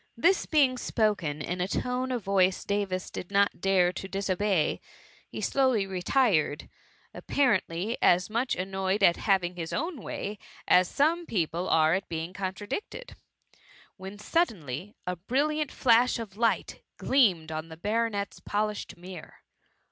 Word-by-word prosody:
^ - - -37
This 355 +10 +3
being 270 -5 +3
spoken 185 -10 0
in 180 +3 -3
a 180 - 0
tone 250 +5 -2
of 245 -4 -2
voice 190 -1 +2
Davis 200 -2 -2
did 180 - -6
not 200 -3 +2
dare 185 -2 +3
to 195 - -6
disobey, 195 -2 0 0.5
he - - -6
slowly 260 -7 +2
retired, 185 - +1 0.5
ap - - -11
parently 210 -5 +1
as 180 +1 +4
much 235 +4 -1
annoyed 190 +2 -1
at 170 -2 +5
having 185 -3 +1
his 165 -2 -5
own 325 -4 -3
way, 205 +1 -5 0.3
as 180 0 +5
some 330 - +1
people 175 -2 -1
are 160 0 +4
at 195 +2 -2
being 165 +1 -4
contradicted; 205 - -5 0.8
when 190 +1 -9
suddenly 205 - -2
a 180 - -2
brilliant 290 - 0
flash 245 0 +3
of 220 -4 -7
light 230 +1 0 0.2
gleamed 185 - +2
on 155 +1 -5
the 160 - -10
baronet^s 210 +1 -2
polished 210 -1 -2
mirror. 180 -1 -11
195 Hz, 145 wpm, -28 LUFS, 180-235 Hz, 0.8 s, at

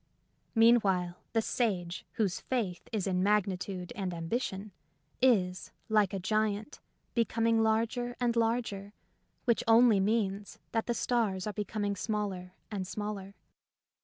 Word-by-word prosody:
Meanwhile, 195 -7 +4 0.2
the 225 -1 +2
sage 185 -8 -1
whose 200 -5 0
faith 210 -9 -3
is 210 -4 -1
in 185 -2 +1
magnitude 190 -2 0
and 185 -3 -3
ambition 195 +3 -3 0.5
is, 185 -8 +2 0.2
like 210 -3 +3
a 195 - -2
giant, 215 +5 -1 0.3
becoming 230 0 +2
larger 230 +2 0
and 240 -1 +1
larger, 225 -3 -1 0.5
which 235 -3 +2
only 225 -2 +6
means 200 -1 0
that 225 - -1
the 240 - 0
stars 220 -7 0
are 210 - -3
becom 210 +1 -3
ing 200 0 0
smaller 195 -3 -3 0.2
and 190 -3 -3
smaller. 200 -1 -5
210 Hz, 130 wpm, -31 LUFS, 190-225 Hz, 0.5 s, only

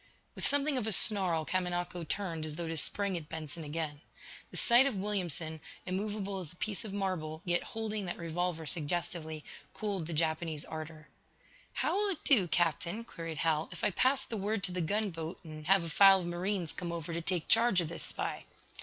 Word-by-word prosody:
With - - -1
something 285 -1 +3
of 220 - -3
a - - +1
snarl 185 -6 +5
Kamanako 175 -1 -2
turned 170 -6 -2
as 155 -1 -4
though 170 0 -4
to 165 - -3
spring 200 +5 +3
at 155 -2 -8
Benson 160 0 -6
again. 150 -1 -4 0.5
The - - -8
sight 245 +3 +6
of 265 - -2
Williamson, 175 -6 -2 0.2
immovable 200 +1 -3
as 175 -5 -7
a - - -14
piece 205 +3 -3
of 215 - -7
marble, 180 -5 -3
yet 175 -1 +2
holding 215 -2 -4
that 175 - -3
revolver 170 0 -2
suggestively, 160 +1 -1 0.3
cooled 200 -7 -2
the 170 - -4
Japanese 160 -1 -1
ardor. 155 -1 -8 0.7
"How - - 0
will 410 +1 +3
it 345 -6 -2
do, 220 -11 +4
Captain," 170 +5 0
queried 165 -7 -7
Hal, 160 0 +1
"if 175 - -8
I - - +3
pass 260 +8 +2
the 225 - -4
word 205 +1 -2
to 180 - +2
the 180 0 -2
gunboat 170 -2 -2
and, 155 -2 -9
have 195 -1 +5
a 165 - -5
file 195 +2 +7
of - - -5
marines 175 0 -2
come 175 -2 -5
over 170 -1 -5
to 170 - -2
take 175 -1 -2
charge 230 -4 +6
of 170 -3 -1
this 170 - -4
spy?" - - -4
175 Hz, 200 wpm, -32 LUFS, 160-200 Hz, 0.7 s, file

